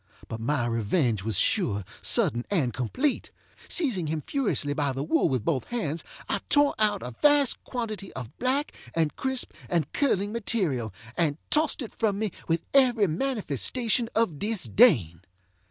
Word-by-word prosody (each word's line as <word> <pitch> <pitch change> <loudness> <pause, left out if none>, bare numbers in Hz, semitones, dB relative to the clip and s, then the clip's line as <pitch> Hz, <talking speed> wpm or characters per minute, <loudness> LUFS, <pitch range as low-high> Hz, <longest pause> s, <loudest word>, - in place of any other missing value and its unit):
But 115 - -6
my 125 +2 0
revenge 115 - 0
was 110 0 -2
sure, 105 - +1 0.2
sudden, 120 +1 +2
and 145 - +1
complete. 255 - -1 0.4
Seizing 235 - +1
him 155 0 -2
furiously 205 - -1
by 145 -2 -1
the 135 +1 -3
wool 165 +2 +2
with 125 -5 -1
both 140 -6 0
hands, 170 -10 -3 0.2
I - - -1
tore 290 -1 +5
out 210 -2 +2
a 125 - -5
vast 290 -3 +4
quantity 215 -6 -5
of 125 -3 -8
black, 270 +4 0 0.2
and 160 -2 +1
crisp, 265 -1 -1 0.2
and 165 -5 -1
curling 205 -8 +1
material, 185 - -1 0.2
and 155 -4 +1
tossed 305 -2 +2
it 225 - -8
from 210 -4 0
me 215 -1 -1 0.2
with 165 0 0
every 250 -6 +5
manifestation 230 - 0
of 200 -10 +1
disdain. 200 - +3
185 Hz, 155 wpm, -27 LUFS, -, 0.4 s, tore